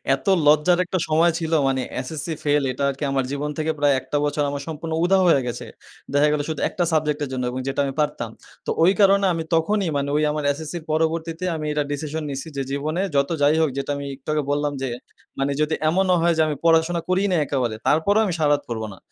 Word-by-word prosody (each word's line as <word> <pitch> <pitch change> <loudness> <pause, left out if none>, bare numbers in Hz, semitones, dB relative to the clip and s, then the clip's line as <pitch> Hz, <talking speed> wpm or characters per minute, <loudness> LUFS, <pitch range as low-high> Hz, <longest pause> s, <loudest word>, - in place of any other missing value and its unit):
এত 135 - -15 0.2
লজ্জার 155 +4 +4
একটা 185 0 -2
সময় 165 +2 +4
ছিল 160 -1 -3 0.2
মানে 130 -1 0 0.2
SSC 155 +4 -5 0.2
ফেইল 145 -1 +2
এটা 130 - -4
আরকি 140 +2 -5
আমার 135 -1 +1
জীবন 145 +1 -2
থেকে 155 0 0
প্রায় 145 -1 +4
১ - - -17
টা 145 - +2
বছর 145 0 0
আমার 140 0 -4
সম্পূর্ণ 160 +1 -5
উধাও 190 +1 +4
হয়ে 140 -5 +4
গেছে। 120 - -5 0.5
দেখা 145 +1 +4
গেলো 150 -1 0
শুধু 155 - -3
১ - - -9
টা - - +4
সাবজেক্ট 150 -1 +1
এর 140 - -4
জন্য 130 -1 -2
এবং 130 - -4
যেটা 135 - -2
আমি 135 - -3
পারতাম। 150 -6 -1 0.4
তো - - -4
ওই 180 - +6
কারণে 200 0 +5
আমি 165 -1 -2
তখনই 195 +4 +1
মানে 140 0 -1
ওই 155 - +1
আমার 150 0 -3
SSC 155 +2 -7
এর 165 - -8
পরবর্তীতে 160 +2 -1
আমি 155 -1 -4
এটা 150 0 0
ডিসিশন 155 +2 -3
নিছি 140 +3 -5
যে, - - 0
জীবনে 155 +5 -2
যত 140 0 +2
যাই 145 +2 +4
হোক 160 - +3
যেটা 140 - -2
আমি 140 - -5
একটু 135 +2 -26
আগে 150 -1 0
বললাম 145 0 0
যে, 135 - -1 0.5
মানে 135 +1 0
যদি 155 +1 +1
এমনও 185 +2 +2
হয় 170 0 +3
যে, - - +4
আমি 150 - -1
পড়াশোনা 165 +1 +3
করিই 190 +2 +2
না - - +2
একেবারে 125 -5 -1
তারপরেও 200 +8 +3
আমি 185 - -1
সারা 150 -2 +3
রাত 145 - 0
পড়ব 110 -2 -3
না। - - -14
150 Hz, 240 wpm, -22 LUFS, 140-165 Hz, 0.5 s, ওই